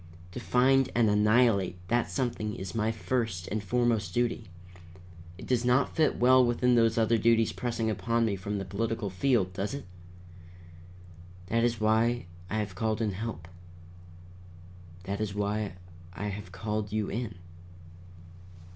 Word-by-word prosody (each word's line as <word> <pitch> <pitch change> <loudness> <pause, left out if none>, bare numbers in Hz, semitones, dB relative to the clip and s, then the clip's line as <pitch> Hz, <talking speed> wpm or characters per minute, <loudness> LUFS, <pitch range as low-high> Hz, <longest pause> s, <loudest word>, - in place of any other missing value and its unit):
To 95 - -6
find 130 +2 +3
and 115 -3 +4
annihilate 105 -3 +3
that 120 0 +1
something 115 -5 -2
is 95 -1 -6
my 110 0 0
first 110 -5 -2
and 110 - -2
foremost 110 -3 0
duty. 120 -2 0 0.9
It - - -9
does 125 -2 +1
not 125 +3 +2
fit 155 - +2
well 130 +1 +6
with 120 -1 0
those 115 -2 +4
other 115 0 +3
duties 115 0 +3
pressing 120 -2 -2
upon 115 +1 0
me 105 -3 0
from 100 +2 -4
the 95 - -4
political 105 +2 -2
field, 100 -3 +1
does 100 +8 -3
it? 140 - -7 1.6
That 115 +2 +2
is 120 -2 +1
why 110 +3 +2 0.2
I 110 - -2
have 105 -3 -2
called 110 +3 -1
in 110 -3 0
help. 100 -4 -6 1.6
That 100 +2 -4
is 100 -2 -3
why 105 0 -1 0.4
I 105 +2 -4
have 100 -2 -7
called 105 +1 -3
you 105 -1 -1
in." 110 -2 -4
110 Hz, 145 wpm, -29 LUFS, 105-120 Hz, 1.6 s, well